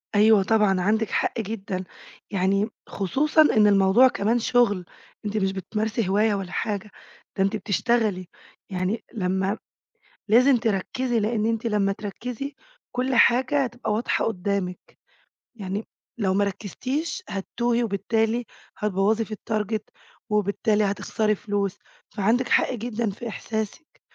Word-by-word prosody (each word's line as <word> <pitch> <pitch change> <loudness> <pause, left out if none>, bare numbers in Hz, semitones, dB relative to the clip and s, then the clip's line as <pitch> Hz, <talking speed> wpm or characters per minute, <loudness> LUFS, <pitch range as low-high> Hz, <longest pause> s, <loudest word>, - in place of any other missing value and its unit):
أيوه 210 -1 +6
طبعًا 205 -3 +3
عندِك 215 +3 +1
حق - - 0
جدًا. 195 -3 -4 0.5
يعني 195 +3 +1 0.2
خصوصًا 285 - +2
إن 215 -8 +5
الموضوع 200 +5 +6
كمان 230 0 +1
شغل، 230 -7 +2 0.4
أنتِ 210 +1 -2
مش 190 -1 +1
بتمارسي 215 +2 -2
هواية 210 +2 +3
ولا 190 -2 -5
حاجة، 210 -2 -3 0.5
ده 195 - +3
أنتِ 195 +3 +1
بتشتغلي. 210 -2 0 0.4
يعني 185 +4 -2
لمّا 190 0 0 0.7
لازم 250 +4 +6
تركّزي، 235 +3 0
لإن 215 0 0
أنتِ 230 0 -1
لمّا 205 -2 +1
تركّزي، 245 +7 -5 0.4
كل 255 +1 -1
حاجة 260 +4 +4
هتبقى 240 -2 -4
واضحة 230 +4 0
قدّامِك. 195 -3 -3 0.6
يعني 200 0 -4 0.3
لو 190 -4 +1
ما 205 +1 +3
ركّزتيش 255 - -3
هتتوهي، 235 +4 -1
وبالتالي 225 +3 0 0.3
هتبوّظي 210 +2 +1
في 215 - -7
الtarget، 215 0 -2 0.5
وبالتالي 210 +1 +1
هتخسري 210 +2 0
فلوس، 200 -1 -2 0.3
فعندِك 230 +5 +1
حق - - +3
جدًا 235 -1 -2
في 220 +4 -6
إحساسِك. 220 +7 -5
215 Hz, 125 wpm, -25 LUFS, 195-235 Hz, 0.7 s, أيوه